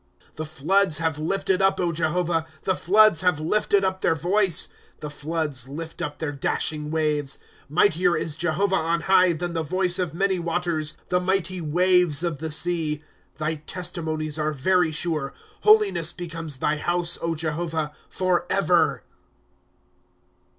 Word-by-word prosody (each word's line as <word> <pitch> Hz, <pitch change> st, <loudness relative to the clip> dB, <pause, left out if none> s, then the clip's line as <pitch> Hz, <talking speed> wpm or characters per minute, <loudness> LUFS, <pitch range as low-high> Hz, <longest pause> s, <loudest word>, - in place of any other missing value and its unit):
■' -, -, -31 dB
The 155 Hz, 0 st, -5 dB
floods 165 Hz, +4 st, +2 dB
have 160 Hz, -2 st, -1 dB
lifted 190 Hz, +3 st, 0 dB
up, 195 Hz, 0 st, +3 dB
Jehovah, 165 Hz, 0 st, 0 dB, 0.2 s
The 190 Hz, -, +1 dB
floods 210 Hz, 0 st, +5 dB
have 180 Hz, -4 st, +2 dB
lifted 200 Hz, +4 st, +2 dB
up 190 Hz, 0 st, -1 dB
their 165 Hz, -, +2 dB
voice; 180 Hz, +2 st, +1 dB, 0.3 s
The 150 Hz, -, -6 dB
floods 150 Hz, -4 st, -3 dB
lift 160 Hz, +3 st, -7 dB
up 145 Hz, -, -4 dB
their 160 Hz, -2 st, -3 dB
dashing 150 Hz, +2 st, -2 dB
waves. 150 Hz, -3 st, -1 dB, 0.2 s
* -, -, -29 dB
Mightier 180 Hz, -3 st, +3 dB
is 155 Hz, -1 st, -2 dB
Jehovah 180 Hz, +4 st, +1 dB
on 170 Hz, +1 st, 0 dB
high. 185 Hz, 0 st, +4 dB
Than 170 Hz, +1 st, -4 dB
the 165 Hz, -, -1 dB
voice 180 Hz, +3 st, -1 dB
of 170 Hz, -4 st, -2 dB
many 190 Hz, 0 st, +1 dB
waters, 165 Hz, -2 st, -2 dB
The 180 Hz, 0 st, +2 dB
mighty 185 Hz, -1 st, -1 dB
waves 175 Hz, 0 st, +2 dB
of 170 Hz, -5 st, -2 dB
the 160 Hz, +1 st, -4 dB
sea. 155 Hz, -1 st, -1 dB, 0.3 s
^ -, -, -27 dB
Thy 155 Hz, +1 st, -2 dB
testimonies 160 Hz, -4 st, -2 dB
are 155 Hz, 0 st, 0 dB
very 170 Hz, +4 st, +2 dB
sure. 155 Hz, -3 st, -2 dB, 0.3 s
Holiness 425 Hz, -, +4 dB
becomes 165 Hz, -4 st, -6 dB
thy 150 Hz, +3 st, 0 dB
house, 175 Hz, +2 st, 0 dB, 0.2 s
Jehovah, 160 Hz, 0 st, -2 dB, 0.2 s
forever. 185 Hz, -2 st, +1 dB
165 Hz, 150 wpm, -24 LUFS, 155-180 Hz, 0.3 s, floods